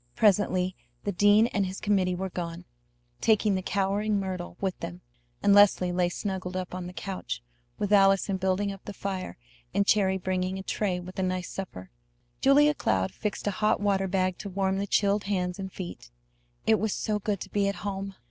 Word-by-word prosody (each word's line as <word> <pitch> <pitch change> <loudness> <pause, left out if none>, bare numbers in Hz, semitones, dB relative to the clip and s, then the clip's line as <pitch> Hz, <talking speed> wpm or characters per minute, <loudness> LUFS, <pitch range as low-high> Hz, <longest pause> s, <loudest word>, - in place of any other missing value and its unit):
Presently 185 -3 +3 0.3
the 205 - -1
dean 205 +3 +5
and 200 -5 0
his 190 +1 -6
committee 190 -3 +1
were 190 +1 -4
gone, 170 0 -5 0.5
taking 215 - +3
the 190 - 0
cowering 200 +2 0
Myrtle 185 -2 -5
with 190 -2 -2
them, 175 +2 -6 0.4
and 200 - +5
Leslie 200 -3 +5
lay 175 0 +1
snuggled 185 -1 -4
up 185 -1 -4
on 180 -1 -4
the - - -7
couch, 155 -11 -5 0.3
with 205 0 0
Allison 195 -1 +4
building 190 +2 0
up 195 -1 -10
the 205 - -7
fire 190 -2 -4 0.4
and 200 - +3
Cherry 195 -2 +3
bringing 185 0 -1
a 190 - -6
tray 190 -2 -1
with 185 +2 -8
a - - +1
nice 185 -1 -2
supper. 95 - -7 0.5
Julia 295 +2 +6
Cloud 95 - 0
fixed 210 -2 -4
a 205 - +1
hot 210 +2 +1
water 195 -1 +1
bag 185 -1 0
to 200 - -5
warm 190 0 0
the 200 - -2
chilled 200 +1 +2
hands 180 -2 -1
and 190 -1 -5
feet. 175 - -8 0.6
It 220 - +4
was 220 -2 0
so 210 -1 -1
good 205 -1 -1
to - - -7
be 200 -1 +2
at 200 - -1
home! 195 -1 -4
195 Hz, 195 wpm, -28 LUFS, 185-205 Hz, 0.6 s, Julia